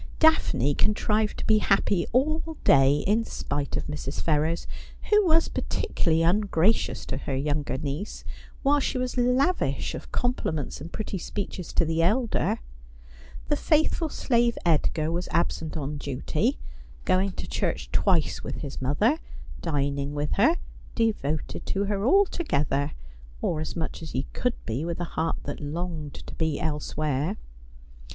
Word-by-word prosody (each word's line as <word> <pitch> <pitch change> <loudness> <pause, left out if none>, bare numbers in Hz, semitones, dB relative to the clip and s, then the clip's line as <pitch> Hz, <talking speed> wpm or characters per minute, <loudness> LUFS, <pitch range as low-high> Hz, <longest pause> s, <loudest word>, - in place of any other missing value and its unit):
Daphne 315 - +4
contrived 210 +4 +1
to - - -4
be 215 -1 +5
happy 195 -3 +2
all 310 +5 +1
day, 140 +1 +5
in 215 +4 +3
spite 145 -9 -3
of - - -3
Mrs. 150 -2 -4
Ferrers, 160 +2 +1 0.5
who 420 0 +6
was 325 0 +4
particularly 165 -1 0
ungracious 195 +2 +2
to - - -3
her 135 0 -3
younger 145 0 -1
niece, 150 +7 -4 0.4
while 290 +1 +4
she 265 - -1
was 255 -1 -2
lavish 255 +8 +1
of - - -8
compliments 160 - -1
and 165 +4 -7
pretty 205 -3 -4
speeches 185 -1 -5
to 170 - +3
the 165 +1 +1
elder. 220 - +1 0.9
The 295 - +2
faithful 315 +2 +2
slave 235 -4 +1
Edgar 160 -1 +2
was 175 +2 -2
absent 165 -1 0
on 150 0 -3
duty 150 - -1 0.2
— - - -20
going 185 +1 +2
to - - -6
church - - -2
twice 180 -6 +2
with - - -5
his 140 -3 -6
mother; 205 - +2 0.4
dining 140 -2 -1
with 145 0 -1
her; 280 - +4 0.4
devoted 180 - -1
to 200 - 0
her 200 -1 -1
altogether, 155 - +2 0.5
or 155 - -1
as 155 - -4
much 160 -1 -3
as 160 - -7
he 130 - 0
could 250 -1 0
be 115 +6 -2
with 170 0 -3
a - - -1
heart 165 +1 0
that 145 - -5
longed 155 0 -4
to - - -10
be 160 -3 -1
elsewhere. 150 +2 -1
170 Hz, 150 wpm, -26 LUFS, 150-225 Hz, 0.9 s, who